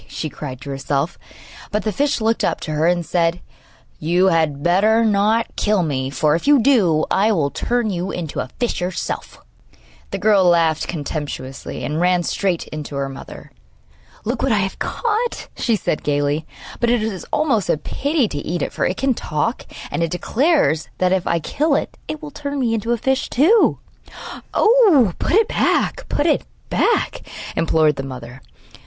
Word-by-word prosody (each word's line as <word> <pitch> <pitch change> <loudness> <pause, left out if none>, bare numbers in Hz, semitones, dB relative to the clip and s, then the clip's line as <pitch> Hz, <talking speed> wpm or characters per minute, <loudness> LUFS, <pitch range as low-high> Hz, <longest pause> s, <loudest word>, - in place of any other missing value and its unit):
she 155 - -5
cried 130 -4 -7
to 140 0 -7
herself; 140 +3 -2 0.5
but 210 -1 -1
the 215 - 0
fish 285 +7 0
looked 225 +1 +1
up - - 0
to 155 - -5
her 155 +2 +1
and 175 -1 +1
said: 170 0 +1 0.6
'You 175 +4 +3
had 155 -4 +1
better 215 +6 +3
not 215 +2 +2
kill 210 -3 +1
me, 135 -4 -1
for, 150 +3 +1
if 170 - -2
you 290 -1 +6
do, 205 - +3
I 210 +3 +3
will 145 -8 +1
turn 240 -3 -1
you 180 +1 -3
into 165 -6 -4
a - - -3
fish 240 -6 -1
yourself!' 180 0 -4 0.7
The - - -3
girl 210 -2 +4
laughed 165 -3 +3
contemptuously, 145 -4 -5
and 150 +3 -2
ran 180 0 +3
straight 185 -1 -1
in 155 - -5
to 140 - -7
her 140 0 -2
mother. 135 - -10 0.7
'Look 235 +2 -2
what 270 - +1
I 215 - +3
have 190 - -7
caught,' 465 +1 -2
she 230 - +1
said 175 - -2
gaily; 145 +2 0 0.3
'but 235 - +2
it 240 -2 +2
is 210 -5 -3
almost 260 - +1
a - - +3
pity 280 - 0
to 145 - -4
eat 165 +1 -3
it, - - -4
for - - 0
it 185 - -2
can 270 -1 +2
talk, 220 - -2 0.2
and - - -2
it 165 - +1
declares 225 - +1
that, 185 0 +2
if 190 -2 +1
I 170 - +2
kill 285 - 0
it, - - -2
it 310 0 -6
will 300 - -7
turn 285 -1 -4
me 235 -3 +1
into 225 +1 -1
a 240 - +2
fish 265 +3 0
too.' 370 - +4 0.8
'Oh, 395 - +5
put - - -1
it 435 +2 +5
back, - - 0
put 290 - 0
it 320 - +3 0.3
back!' - - +1 0.3
implored 155 -2 +2
the - - -2
mother. 130 -1 -8
185 Hz, 185 wpm, -20 LUFS, 155-240 Hz, 0.8 s, you